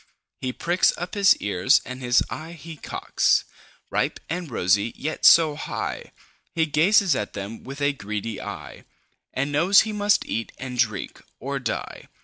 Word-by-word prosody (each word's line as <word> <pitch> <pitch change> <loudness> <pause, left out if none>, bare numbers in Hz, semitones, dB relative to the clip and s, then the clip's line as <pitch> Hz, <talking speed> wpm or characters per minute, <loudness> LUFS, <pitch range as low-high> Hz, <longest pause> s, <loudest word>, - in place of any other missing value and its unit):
He 130 - -2
pricks 175 +7 +2
up 175 - -6
his 200 -2 +5
ears, 100 +6 +2
and 130 0 -7
his 125 0 +3
eye 160 +2 -7
he 165 0 -10
cocks. - - 0 0.5
Ripe - - -1
and 175 -1 -3
rosy, 105 0 +1
yet 155 +2 -3
so 160 -3 +7
high! - - -5 0.4
He 165 -1 +2
gazes 170 +3 +3
at 105 - -3
them 100 +3 -7
with 135 +2 -8
a 145 0 +2
greedy 105 -2 -5
eye, - - -8 0.5
And 140 +2 -2
knows 175 +8 +5
he 220 -1 -3
must 205 0 +2
eat 115 0 -4
and 125 -1 -6
drink 110 -5 -1 0.2
or - - -3
die. - - -5
145 Hz, 160 wpm, -24 LUFS, 115-170 Hz, 0.5 s, so